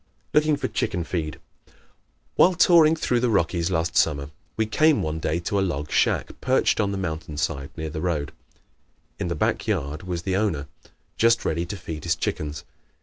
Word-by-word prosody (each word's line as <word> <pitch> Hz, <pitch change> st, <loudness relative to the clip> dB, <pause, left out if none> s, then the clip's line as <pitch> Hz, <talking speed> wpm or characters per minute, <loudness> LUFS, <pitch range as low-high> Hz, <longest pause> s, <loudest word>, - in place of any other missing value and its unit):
Looking 150 Hz, -1 st, +3 dB
for -, -, -2 dB
"Chicken 85 Hz, 0 st, -2 dB
Feed" 80 Hz, -3 st, -4 dB, 0.3 s
¶ -, -, -26 dB, 0.6 s
While 180 Hz, 0 st, +5 dB
touring 165 Hz, -2 st, +6 dB
through 125 Hz, -6 st, 0 dB
the 125 Hz, 0 st, +1 dB
Rockies 85 Hz, -4 st, +1 dB
last 80 Hz, -2 st, -1 dB
summer 70 Hz, -2 st, +1 dB, 0.3 s
we 110 Hz, -, +2 dB
came 155 Hz, +7 st, +3 dB
one 80 Hz, +1 st, -2 dB
day 80 Hz, 0 st, -1 dB
to 100 Hz, +3 st, -1 dB
a -, -, +2 dB
log 75 Hz, -6 st, -2 dB
shack -, -, +1 dB
perched 130 Hz, +1 st, +2 dB
on 100 Hz, -2 st, +1 dB
the 100 Hz, -, -3 dB
mountain 80 Hz, -4 st, -4 dB
side 70 Hz, -2 st, -2 dB
near 80 Hz, -1 st, -4 dB
the 80 Hz, -, -4 dB
road. 75 Hz, -6 st, -1 dB, 0.9 s
In -, -, -2 dB
the 85 Hz, -, -2 dB
back -, -, 0 dB
yard 70 Hz, +3 st, -2 dB
was 90 Hz, -2 st, -4 dB
the 95 Hz, 0 st, -1 dB
owner, 95 Hz, -9 st, 0 dB, 0.5 s
just 115 Hz, 0 st, +3 dB
ready 85 Hz, +2 st, -1 dB
to 100 Hz, -, -5 dB
feed 80 Hz, -4 st, -7 dB
his 85 Hz, -, +2 dB
chickens. 75 Hz, 0 st, -3 dB
85 Hz, 190 wpm, -24 LUFS, 75-110 Hz, 0.9 s, touring